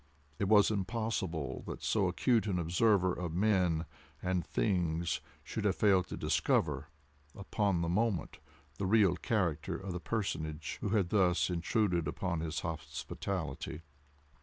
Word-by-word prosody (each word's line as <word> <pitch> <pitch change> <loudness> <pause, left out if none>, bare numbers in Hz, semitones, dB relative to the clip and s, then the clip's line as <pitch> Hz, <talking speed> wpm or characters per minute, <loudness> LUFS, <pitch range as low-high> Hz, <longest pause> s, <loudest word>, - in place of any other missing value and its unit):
It 100 - +1
was 105 +1 +6
impossible 95 - -2
that - - -6
so - - +2
accurate 115 -3 +2
an 95 -3 0
observer 90 +2 +3
of 85 -3 -4
men 90 -5 +2 0.3
and 90 -1 0
things 85 -4 0 0.2
should 110 +7 -4
have 100 -3 +2
failed 95 -4 +3
to - - -6
discover, - - +1 0.5
upon 100 -2 0
the - - -1
moment, 100 0 0 0.4
the 95 - 0
real 100 -3 +4
character 85 -9 -1
of 95 -2 -5
the 90 - -3
personage 80 -8 -3
who - - -1
had 100 -5 +2
thus 90 -3 +3
intruded 90 -1 +1
upon 85 +1 -2
his 80 0 -3
hospitality. 80 0 -4
90 Hz, 135 wpm, -33 LUFS, 85-105 Hz, 0.5 s, was